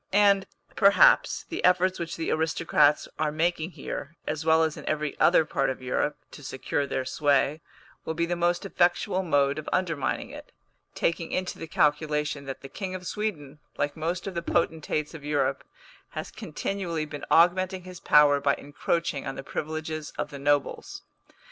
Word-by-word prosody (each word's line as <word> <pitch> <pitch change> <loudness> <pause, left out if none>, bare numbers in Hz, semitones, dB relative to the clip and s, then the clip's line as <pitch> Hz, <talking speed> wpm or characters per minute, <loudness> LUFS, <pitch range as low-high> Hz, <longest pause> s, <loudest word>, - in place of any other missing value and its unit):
And, 200 -1 +4 0.3
perhaps, 215 - +5
the 340 - -5
efforts 185 +1 +3
which 170 -1 -4
the 165 - -2
aristocrats 150 -2 +2
are 150 - +1
making 165 +2 -1
here, 150 +4 -6
as 155 +1 -3
well 160 0 +4
as 160 -1 0
in - - -9
every 150 -1 -1
other 165 -2 +5
part 135 -2 0
of 130 - -3
Europe, 130 +3 -1
to - - -11
secure 140 +1 -2
their 130 -1 -2
sway, 145 +2 +1 0.4
will 160 - -4
be 170 +1 +1
the 175 +1 -1
most 175 +2 0
effectual 180 0 +1
mode 145 -4 +2
of 155 - -6
undermining 165 -8 -1
it, - - -11 0.4
taking 165 0 -1
into 185 0 -2
the 165 - -6
calculation 150 -2 0
that 135 0 -6
the 135 - -8
King 185 +6 -5
of 180 -1 -7
Sweden, 155 -9 -4 0.2
like 145 0 -1
most 170 +3 -3
of 195 - -4
the 170 - -2
potentates 160 -2 -1
of 160 -3 -9
Europe, 145 -2 0 0.5
has - - -4
continually 170 -1 -3
been 150 -1 -8
augmenting 185 +2 +3
his 180 -1 -10
power 145 -2 +5
by 140 0 +2
encroaching 145 +1 -2
on - - -4
the 135 - -6
privileges 155 +1 -4
of - - -3
the 140 - -7
nobles. 145 0 -1
155 Hz, 175 wpm, -27 LUFS, 145-175 Hz, 0.5 s, perhaps